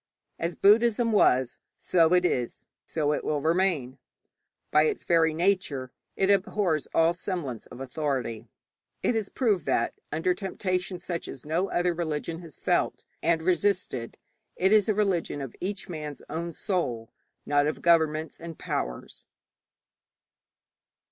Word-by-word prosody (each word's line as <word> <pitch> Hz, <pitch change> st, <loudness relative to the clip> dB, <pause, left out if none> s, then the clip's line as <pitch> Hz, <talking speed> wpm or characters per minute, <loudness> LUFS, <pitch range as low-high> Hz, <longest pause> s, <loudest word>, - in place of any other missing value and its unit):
As 170 Hz, +1 st, -2 dB
Buddhism 230 Hz, +3 st, +4 dB
was, 130 Hz, -, +3 dB, 0.2 s
so 170 Hz, -1 st, +3 dB
it 180 Hz, 0 st, +3 dB
is, 125 Hz, -8 st, -1 dB, 0.2 s
so 150 Hz, -2 st, 0 dB
it -, -, -2 dB
will 150 Hz, -, 0 dB
remain. 160 Hz, -5 st, 0 dB, 0.7 s
By 150 Hz, +1 st, +5 dB
its -, -, -1 dB
very 165 Hz, -2 st, +3 dB
nature 160 Hz, -7 st, 0 dB, 0.2 s
it 195 Hz, +1 st, +3 dB
abhors 195 Hz, -5 st, +1 dB
all 165 Hz, +1 st, +4 dB
semblance 170 Hz, -, -4 dB
of -, -, -11 dB
authority. 130 Hz, -4 st, -3 dB, 0.6 s
It -, -, +2 dB
has 220 Hz, -3 st, -1 dB
proved 205 Hz, -, 0 dB
that, -, -, +1 dB, 0.2 s
under 165 Hz, +4 st, +1 dB
temptation 185 Hz, -1 st, -2 dB
such 175 Hz, -1 st, -5 dB
as 135 Hz, -, -9 dB
no 170 Hz, +6 st, 0 dB
other 175 Hz, 0 st, +1 dB
religion 165 Hz, -1 st, -3 dB
has 165 Hz, -5 st, -11 dB
felt, -, -, 0 dB, 0.2 s
and 165 Hz, 0 st, +2 dB
resisted; 180 Hz, -, 0 dB, 0.4 s
it 190 Hz, +2 st, +2 dB
is 215 Hz, -1 st, +5 dB
a 215 Hz, -, +2 dB
religion 195 Hz, -8 st, 0 dB
of 135 Hz, -3 st, -6 dB
each 200 Hz, +1 st, -3 dB
man's 150 Hz, -4 st, -6 dB
own 170 Hz, +2 st, -3 dB
soul, 135 Hz, -, -2 dB, 0.3 s
not 145 Hz, 0 st, +3 dB
of 155 Hz, -, -3 dB
governments 160 Hz, -2 st, +2 dB
and 165 Hz, -1 st, -8 dB
powers. -, -, -4 dB
165 Hz, 140 wpm, -27 LUFS, 150-185 Hz, 0.7 s, By